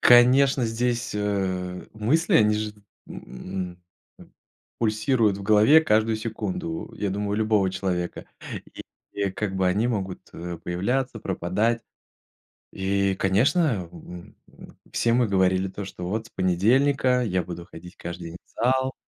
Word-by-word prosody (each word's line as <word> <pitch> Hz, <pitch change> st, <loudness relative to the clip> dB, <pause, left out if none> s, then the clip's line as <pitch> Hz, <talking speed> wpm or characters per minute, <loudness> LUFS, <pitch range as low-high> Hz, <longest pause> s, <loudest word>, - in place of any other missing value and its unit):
Конечно, 125 Hz, +2 st, +6 dB
здесь, 120 Hz, +1 st, -1 dB
э, 95 Hz, -3 st, -2 dB
мысли, 130 Hz, +11 st, +1 dB
они 105 Hz, -1 st, +4 dB
же 105 Hz, 0 st, -2 dB
т 105 Hz, -, -23 dB, 0.3 s
м, 90 Hz, +5 st, -7 dB, 0.4 s
м, -, -, -16 dB, 0.5 s
пульсируют 110 Hz, -1 st, +2 dB
в -, -, -7 dB
голове 110 Hz, +9 st, +6 dB
каждую 110 Hz, -6 st, +2 dB
секунду, 165 Hz, +10 st, -4 dB
я 100 Hz, -, -2 dB
думаю, 100 Hz, +1 st, -2 dB
у -, -, 0 dB
любого 105 Hz, -3 st, +2 dB
человека, 90 Hz, -2 st, -3 dB, 0.5 s
и -, -, -8 dB, 0.3 s
и, 100 Hz, -1 st, -1 dB
как 95 Hz, 0 st, -3 dB
бы, 95 Hz, -, +2 dB
они 105 Hz, +6 st, +2 dB
могут, 95 Hz, -6 st, -3 dB
э, 85 Hz, 0 st, -6 dB
появляться, 120 Hz, +8 st, -1 dB
пропадать. 105 Hz, +6 st, 0 dB, 0.9 s
И, 95 Hz, 0 st, 0 dB
конечно, 105 Hz, -, +2 dB
м, 85 Hz, +1 st, -11 dB, 0.6 s
все 115 Hz, -, +1 dB
мы 120 Hz, -1 st, +3 dB
говорили 95 Hz, -1 st, +2 dB
то, 100 Hz, +1 st, -6 dB
что 90 Hz, -2 st, -7 dB
вот 110 Hz, +4 st, -3 dB
с -, -, -22 dB
понедельника 125 Hz, +9 st, +2 dB
я 95 Hz, -5 st, 0 dB
буду 85 Hz, 0 st, -7 dB
ходить 90 Hz, +2 st, -12 dB
каждый 85 Hz, 0 st, -7 dB
день 85 Hz, -, -9 dB
в -, -, -35 dB
зал, 130 Hz, +1 st, +2 dB
105 Hz, 145 wpm, -25 LUFS, 95-120 Hz, 0.9 s, Конечно